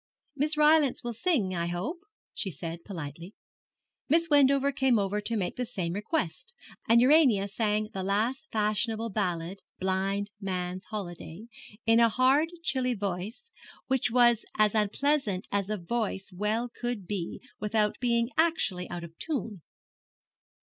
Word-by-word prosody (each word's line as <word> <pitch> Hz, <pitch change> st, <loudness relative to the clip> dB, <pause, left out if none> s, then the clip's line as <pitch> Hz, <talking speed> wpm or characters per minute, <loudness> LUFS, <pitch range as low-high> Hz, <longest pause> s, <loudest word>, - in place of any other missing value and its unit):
'Miss 300 Hz, +2 st, 0 dB
Rylance 300 Hz, -3 st, +4 dB
will 240 Hz, 0 st, -3 dB
sing, 230 Hz, -, 0 dB
I 170 Hz, 0 st, -1 dB
hope,' 195 Hz, -, -3 dB, 0.3 s
she 195 Hz, -, -3 dB
said, 165 Hz, +1 st, -6 dB
politely. 170 Hz, +1 st, -8 dB, 0.7 s
Miss 330 Hz, +3 st, +3 dB
Wendover 280 Hz, -1 st, +5 dB
came 265 Hz, -3 st, +2 dB
over 205 Hz, +1 st, 0 dB
to 230 Hz, +2 st, -1 dB
make 185 Hz, -3 st, -2 dB
the 250 Hz, -, -1 dB
same 180 Hz, -8 st, -3 dB
request, 325 Hz, -, -3 dB, 0.3 s
and 230 Hz, +1 st, +6 dB
Urania 255 Hz, -7 st, +5 dB
sang 215 Hz, 0 st, -1 dB
the 190 Hz, -, -3 dB
last 225 Hz, +10 st, -1 dB
fashionable 220 Hz, +1 st, 0 dB
ballad, 185 Hz, -2 st, -2 dB, 0.2 s
'Blind 195 Hz, +2 st, -1 dB
Man's 185 Hz, -1 st, -3 dB
Holiday,' 180 Hz, -1 st, -7 dB, 0.4 s
in 225 Hz, +1 st, +5 dB
a 230 Hz, -1 st, +6 dB
hard 265 Hz, +7 st, +3 dB
chilly 255 Hz, -5 st, +1 dB
voice 205 Hz, -, -5 dB, 0.3 s
which 265 Hz, -4 st, +1 dB
was 240 Hz, -1 st, +4 dB
as 215 Hz, -1 st, +4 dB
unpleasant 215 Hz, -1 st, +1 dB
as 200 Hz, -1 st, 0 dB
a 215 Hz, -, -1 dB
voice 200 Hz, +1 st, -3 dB
well 210 Hz, +5 st, -1 dB
could 240 Hz, -4 st, -4 dB
be 180 Hz, -2 st, -4 dB, 0.2 s
without 210 Hz, 0 st, 0 dB
being 235 Hz, 0 st, +1 dB
actually 320 Hz, -, +1 dB
out 175 Hz, -1 st, -5 dB
of 165 Hz, -1 st, -10 dB
tune. 225 Hz, -, -3 dB
215 Hz, 145 wpm, -28 LUFS, 190-255 Hz, 0.7 s, and